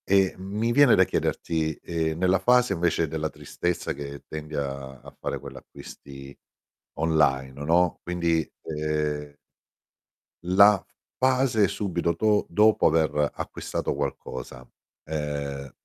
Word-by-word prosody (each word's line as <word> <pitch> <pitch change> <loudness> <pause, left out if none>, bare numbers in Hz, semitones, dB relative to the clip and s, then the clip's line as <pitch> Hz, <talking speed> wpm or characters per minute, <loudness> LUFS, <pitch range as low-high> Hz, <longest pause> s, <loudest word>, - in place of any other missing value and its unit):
E 95 -1 +3
mi 105 +5 -2
viene 140 0 +6
da 95 - +6
chiederti, 80 -3 -1
ehm, 80 -2 -3
nella 95 +1 +2
fase 125 +1 +4
invece 85 -2 +1
della 80 +1 -3
tristezza 90 +2 -3
che 70 0 -8
tendi 75 0 -7
a 70 -2 -4
a - - -14
fare - - -3
quell'acquisti 70 0 -11 0.6
online, 75 -5 +1
no, 85 +2 +2
quindi, 85 -2 0 0.2
ehm 75 -1 -2 1.1
la 100 +2 +6 0.4
fase 130 -5 +3
subito 85 -4 -1
do 105 +2 +2
dopo 105 +4 +4
aver 75 -2 +2
acquistato - - -4
qualcosa, 65 0 -5 0.4
ehm, 70 -3 -4
80 Hz, 115 wpm, -26 LUFS, 75-95 Hz, 1.1 s, viene